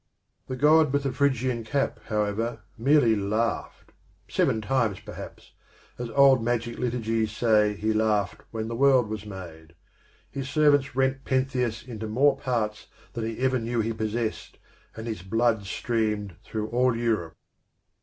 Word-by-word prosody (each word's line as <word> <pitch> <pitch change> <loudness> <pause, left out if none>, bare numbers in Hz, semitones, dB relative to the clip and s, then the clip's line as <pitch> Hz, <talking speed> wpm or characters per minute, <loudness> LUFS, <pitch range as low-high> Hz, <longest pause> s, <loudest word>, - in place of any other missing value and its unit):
The 130 - -4
God 150 +2 +5
with 140 0 +1
the 135 - -1
Phrygian 130 -4 0
cap, 135 +5 -1
however, 110 +1 -2
merely 130 -1 +4
laughed, 110 +3 -2 0.4
seven 110 - +1
times 110 -2 0
perhaps, - - -10 0.5
as 120 -1 -4
old 135 -1 +5
magic 120 0 -1
liturgies 115 -3 -1
say 105 -2 +3
he 110 +2 0
laughed 110 -2 0
when 110 -1 -4
the 115 - -4
world 130 -3 +4
was 105 -1 -5
made; 85 -4 -10 0.6
his 135 0 -5
servants 145 -3 +3
rent 135 +1 +1
Pentheus 130 -4 -1
into 110 -3 -6
more 135 +6 +3
parts 115 -5 -2 0.3
than 115 -2 -3
he 115 - -5
ever 130 -1 +2
knew 115 +1 -2
he 115 +1 -1
possessed, 110 +1 -3 0.4
and 110 - -6
his 110 -6 -4
blood 110 +2 +1
streamed 105 -4 -1
through 110 -1 -4
all 125 +1 +2
Europe. 110 -9 -1
115 Hz, 145 wpm, -26 LUFS, 110-130 Hz, 0.6 s, God